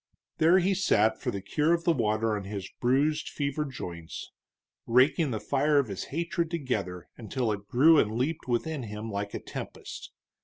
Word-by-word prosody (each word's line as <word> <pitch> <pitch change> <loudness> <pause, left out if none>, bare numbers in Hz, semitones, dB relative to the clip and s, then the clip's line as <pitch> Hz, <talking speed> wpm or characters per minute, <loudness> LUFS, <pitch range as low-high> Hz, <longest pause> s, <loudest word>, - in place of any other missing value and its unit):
There 165 +4 +6
he 190 +2 +3
sat 110 - +2
for - - -1
the 100 -1 -4
cure 155 +10 +2
of 170 - -5
the 170 - +3
water 110 -3 +1
on 100 -2 -5
his 100 -1 -5
bruised, 145 +5 +1
fevered 145 0 -2
joints, 85 -10 -7 0.6
raking 135 +6 +4
the 110 -4 -2
fire 145 +4 +2
of 140 -5 +2
his 100 - -4
hatred 170 +2 -2
together 105 - -3
until 120 0 -2
it 100 -1 -5
grew 150 +7 +6
and 105 - +1
leaped 140 +3 -2
within 135 +5 -1
him 110 0 -6
like 100 0 -3
a - - -3
tempest. - - -8
130 Hz, 180 wpm, -28 LUFS, 105-155 Hz, 0.6 s, There